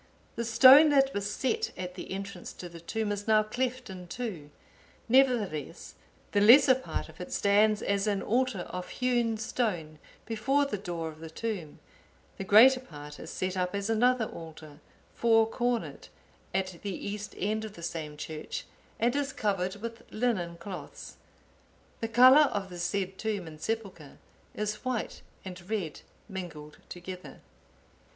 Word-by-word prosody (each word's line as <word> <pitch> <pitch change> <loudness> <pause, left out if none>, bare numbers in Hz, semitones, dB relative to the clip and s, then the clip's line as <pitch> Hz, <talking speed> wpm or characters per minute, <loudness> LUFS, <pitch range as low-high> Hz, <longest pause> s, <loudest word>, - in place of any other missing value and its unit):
The 235 - -2
stone 260 +7 +8
that 275 -1 +3
was 200 0 -2
set 435 - -1
at 180 0 -5
the 180 - -8
entrance 195 -1 -6
to 180 - -8
the 170 -1 -11
tomb 215 +5 -3
is 205 +1 -4
now 215 -1 +5
cleft 250 +3 -3
in 185 -2 -9
two; 190 - -5 0.6
nevertheless, 230 - +1 0.4
the 205 - +2
lesser 260 +5 +8
part 260 +1 -4
of - - -13
it - - -7
stands 210 +1 +3
as 200 +1 0
an 200 -2 0
altar 245 -4 0
of 180 +1 -6
hewn 240 -3 0
stone 180 -9 -2 0.3
before 265 +6 +1
the 210 -8 -3
door 170 -4 -4
of 155 0 -12
the 160 0 -8
tomb; 180 -4 -5 0.6
the - - -2
greater 235 +7 +7
part 150 - -11
is 160 - -8
set 185 +1 -3
up 180 +1 -1
as 200 +2 -1
another 245 +1 +3
altar, 155 -5 -10 0.3
four 225 -1 +4
cornered, 240 +1 -2 0.4
at 185 -2 -2
the 200 -3 -4
east 210 +1 -5
end 215 +2 -1
of 215 -2 -7
the 170 - -11
same 155 -3 -5
church, 155 0 -6 0.3
and 235 +3 +2
is 285 -1 -1
covered 195 -4 -1
with 230 +2 -7
linen 200 -8 -1
cloths. 180 +2 -9 0.8
The 225 - -2
colour 255 +6 +7
of 195 -2 -3
the 175 - -7
said 190 +2 -2
tomb 210 -5 -2
and 155 -1 -11
sepulchre 195 -10 -5 0.4
is 210 0 -3
white 255 -3 -3 0.2
and 180 -1 -7
red 190 -9 -3 0.3
mingled 170 -7 -8
together." 180 +1 -9
205 Hz, 160 wpm, -29 LUFS, 180-235 Hz, 0.8 s, stone